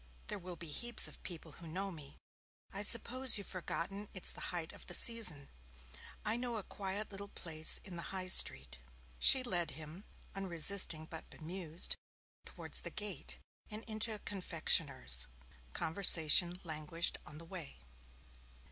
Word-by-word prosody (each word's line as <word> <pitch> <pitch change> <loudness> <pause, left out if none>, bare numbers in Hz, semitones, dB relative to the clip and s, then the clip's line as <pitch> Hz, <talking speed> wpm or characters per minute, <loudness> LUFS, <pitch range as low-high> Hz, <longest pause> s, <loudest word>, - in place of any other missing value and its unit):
There 210 - -3
will 180 -1 -7
be 165 -2 -7
heaps 240 +8 +2
of - - -12
people 165 -3 -8
who 170 +3 -12
know 190 +5 -4
me. 150 -5 -12 0.6
I 200 - -3
suppose 235 +4 +4
you've 200 - -5
forgotten 195 +3 -5
it's 185 - -1
the - - -9
height 170 -2 -5
of - - -13
the - - 0
season. 205 -12 +2 0.8
I 215 +2 -1
know 240 -1 -4
a 210 - -4
quiet 200 +3 -5
little 200 0 -6
place 160 -5 +3
in 185 -4 -9
the - - -5
High 185 -1 -5
Street.' 65 - +4 0.4
She 265 - +7
led 175 -8 0
him, 160 +5 -10 0.3
unresisting 180 -3 +4
but 160 0 -8
bemused, 170 0 -2 0.5
towards - - -4
the - - -6
gate, 205 -8 -3 0.3
and 215 +1 -6
into 220 0 +3
a - - -7
confectioner's. 165 - +1 0.4
Conversation 170 - +5
languished 160 0 -3
on 150 - -11
the 165 - -11
way. 165 - -9
180 Hz, 150 wpm, -35 LUFS, 160-205 Hz, 0.8 s, She